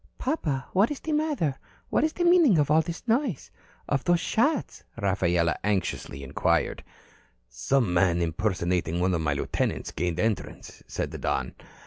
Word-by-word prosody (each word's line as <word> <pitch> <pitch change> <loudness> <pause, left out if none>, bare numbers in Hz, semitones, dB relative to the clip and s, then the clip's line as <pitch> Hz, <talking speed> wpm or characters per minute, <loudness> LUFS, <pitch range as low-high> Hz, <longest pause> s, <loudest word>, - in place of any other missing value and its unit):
"Papa, 155 - -2
what 200 +4 +4
is 295 - -4
the 320 - -4
matter? 295 - 0 0.3
What - - +2
is 315 0 +1
the 350 - -2
meaning 340 - +6
of 150 -1 +2
all 155 +1 +5
this 170 +7 -7
noise? 235 - 0 0.4
Of 140 -2 0
those 175 -1 +3
shots?" 275 - 0
Rafaela 90 -4 +1
anxiously 95 -8 -2
inquired. 70 +1 0 0.6
"Some 105 - 0
man 90 -1 +3
impersonating 85 -1 -1
one 90 +1 +2
of 80 - 0
my 75 -2 +1
lieutenants 70 - -2
gained 85 +2 -2
entrance," 105 -4 -3
said - - -3
the - - -7
Don. - - -1
115 Hz, 155 wpm, -26 LUFS, -, 0.6 s, meaning